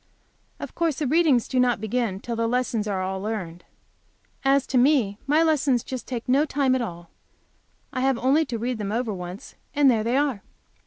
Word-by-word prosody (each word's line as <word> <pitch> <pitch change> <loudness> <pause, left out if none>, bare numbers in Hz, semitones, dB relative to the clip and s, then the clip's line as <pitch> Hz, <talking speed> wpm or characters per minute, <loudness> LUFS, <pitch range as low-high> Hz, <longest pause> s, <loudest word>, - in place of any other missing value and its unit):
Of - - -7
course 330 -4 0
the 300 - -1
readings 290 -4 +3
do 260 - 0
not 245 -3 +2
begin 220 -2 -2
till 235 +3 -5
the 230 0 0
lessons 235 -3 -1
are 190 -2 -1
all 190 0 -3
learned. 185 -5 -5 0.8
As 275 0 +3
to 255 - +1
me, 245 -7 +2
my 305 +3 +4
lessons 285 -6 +2
just 260 -3 -6
take 240 -3 -5
no 270 +4 +4
time 280 -3 +1
at 260 - +1
all. 175 -6 -7 0.8
I 255 - -2
have 265 -1 +2
only 270 +6 +3
to 245 -4 -4
read 240 +1 -3
them 205 -1 -3
over 230 -1 -1
once, 180 +1 -8 0.2
and 285 -2 +5
there 220 -3 +1
they 235 +4 +1
are. 275 -8 0
245 Hz, 200 wpm, -24 LUFS, 215-270 Hz, 0.8 s, and